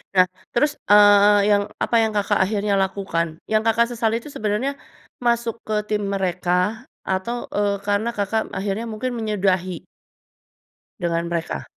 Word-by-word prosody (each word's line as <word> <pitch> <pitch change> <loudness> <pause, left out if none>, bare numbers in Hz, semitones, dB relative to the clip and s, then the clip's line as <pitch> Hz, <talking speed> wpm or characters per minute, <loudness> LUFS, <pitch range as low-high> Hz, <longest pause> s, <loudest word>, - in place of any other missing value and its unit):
Nah 185 -1 +7 0.3
terus, 295 +5 +2 0.2
eee, 205 0 +7
yang 205 0 +3
apa - - -1
yang 220 -1 +1
Kakak 205 0 +1
akhirnya 205 +1 0
lakukan? 190 -4 -1
Yang 215 0 +1
Kakak 235 +1 +3
sesali 225 -1 0
itu 235 +6 -9
sebenarnya, 215 +6 -1 0.5
masuk 235 -1 0
ke 210 -1 -2
tim 210 0 -1
mereka 185 +4 -1 0.2
atau, 230 +6 -2
eee, 205 -1 +1
karena 205 +3 0
Kakak 220 -1 -2
akhirnya 200 +3 -3
mungkin 225 +4 -3
menyudahi 190 -5 -1 1.1
dengan 170 -1 -1
mereka? 170 -1 -3
205 Hz, 140 wpm, -22 LUFS, 190-225 Hz, 1.1 s, Nah